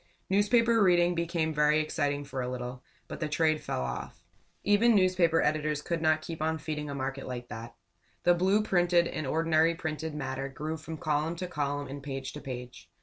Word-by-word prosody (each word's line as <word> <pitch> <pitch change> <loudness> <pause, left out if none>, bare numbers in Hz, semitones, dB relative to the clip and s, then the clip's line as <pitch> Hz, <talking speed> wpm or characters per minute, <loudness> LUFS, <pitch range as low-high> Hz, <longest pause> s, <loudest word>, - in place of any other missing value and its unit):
Newspaper 230 +3 +4
reading 175 -2 +4
became 170 -2 -1
very 150 +1 +3
exciting 145 -2 -1
for 135 -2 -4
a 125 - -2
little, 125 0 -5 0.2
but - - -7
the 155 - -2
trade 155 0 +2
fell - - -3
off. 60 -1 -6 0.4
Even 215 +3 +4
newspaper 185 -4 +3
editors 150 -1 0
could 170 -2 -2
not 155 -1 +2
keep 165 -1 -6
on 160 0 0
feeding 150 -1 -4
a 140 - -4
market 135 0 -4
like 120 -1 -6
that. 115 +2 -8 0.5
The 175 - +6
blue 190 +4 +2
printed 175 -3 +3
and 155 -4 -4
ordinary 160 +2 +3
printed 160 -2 -4
matter 135 -1 -3
grew 155 +4 -4
from 160 0 -7
column 155 +2 0
to 180 - -4
column 145 -3 -2
and 140 +2 -7
page 135 -1 -5
to 150 - -7
page. 125 -9 -8
155 Hz, 190 wpm, -29 LUFS, 140-170 Hz, 0.5 s, The